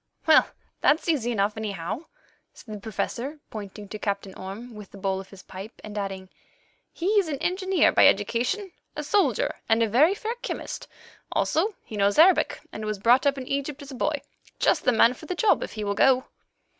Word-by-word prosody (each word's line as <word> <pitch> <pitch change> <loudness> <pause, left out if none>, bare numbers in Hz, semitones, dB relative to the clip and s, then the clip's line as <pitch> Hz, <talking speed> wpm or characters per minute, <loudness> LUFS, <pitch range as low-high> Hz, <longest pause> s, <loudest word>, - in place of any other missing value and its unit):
"Well, 315 -1 +6 0.3
that's 310 +4 +3
easy 265 -8 +1
enough, 205 -2 0
anyhow," 215 - -4 0.5
said 215 - -10
the 210 - -6
Professor, 240 +7 -4
pointing 205 -1 -8
to 215 - -6
Captain 200 -2 -3
Orme 200 +7 -8
with 210 -2 -10
the - - -13
bowl 190 0 -1
of 195 - -15
his 195 -2 -13
pipe, 195 +4 -10
and 210 -1 -8
adding, 195 -2 -4 0.6
"he 340 - -6
is 385 - 0
an 295 -3 -2
engineer 375 +4 +2
by - - +6
education, 365 - +1 0.2
a 300 - -3
soldier 410 +10 +1
and 225 +1 +4
a - - +2
very 290 - +4
fair 445 +2 -3
chemist; - - -5 0.4
also 390 +6 +1
he 215 - -7
knows 200 0 +2
Arabic 325 -1 +5
and 215 - -6
was 215 -1 -2
brought 245 +7 +4
up 280 0 +2
in 260 - -5
Egypt 280 +1 -3
as 280 - -10
a - - -7
boy—just 285 +2 -2
the 255 - +5
man 230 +1 +5
for 310 +5 -12
the 365 - -2
job 415 +4 +3
if - - -5
he 215 - -4
will 200 0 0
go." 260 +4 +4
240 Hz, 195 wpm, -26 LUFS, 205-305 Hz, 0.6 s, Well